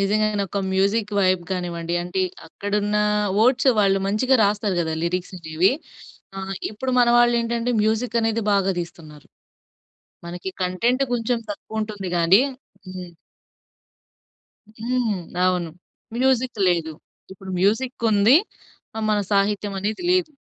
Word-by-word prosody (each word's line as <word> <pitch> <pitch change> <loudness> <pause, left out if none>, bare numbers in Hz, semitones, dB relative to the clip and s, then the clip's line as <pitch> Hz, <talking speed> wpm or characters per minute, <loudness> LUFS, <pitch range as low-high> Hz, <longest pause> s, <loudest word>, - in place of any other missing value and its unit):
నిజంగానె 210 +1 +1
ఒక 200 - -3
music 200 +3 +1
vibe 185 -2 +2
గానివ్వండి, 170 -2 -3
అంటే 180 +2 -3 0.3
అక్కడున్న 205 +4 -2 0.4
వర్డ్స్ 255 +4 +4
వాళ్ళు 195 -1 +3
మంచిగా 255 +7 +2
రాస్తారు 205 -2 0
గదా! 160 -1 -1
లిరిక్స్ 180 +2 -2
అనేవి. 165 +6 +1 0.7
ఆహ్, 195 0 -4 0.2
ఇప్పుడు 235 +5 -4
మన 240 - +4
వాళ్ళేంటంటే 235 0 +2
మ్యూజికనేది 225 0 0
బాగా 195 -1 +2
దీస్తున్నారు. 155 -3 -10 1.0
మనకి 175 +2 -6
కంటెంట్ 235 +9 +1
కొంచెం 240 0 0
తక్కువ 220 +2 -5
ఉంటుంది 205 -4 -5
గాని 175 +7 +5 0.5
హ్మ్. 185 -1 -8 1.7
హ్మ్. 240 0 0 0.3
అవును. 180 -2 +1 0.5
మ్యూజిక్ 255 -2 +1
లేదు. 165 -3 0 0.4
ఇప్పుడు 190 0 -10
మ్యూజిక్ 230 +5 0
ఉంది. 215 +6 +5 0.7
మన 210 - +2
సాహిత్యమనేది 205 - 0
లేదు. 365 -3 +1
205 Hz, 110 wpm, -22 LUFS, 185-230 Hz, 1.7 s, గాని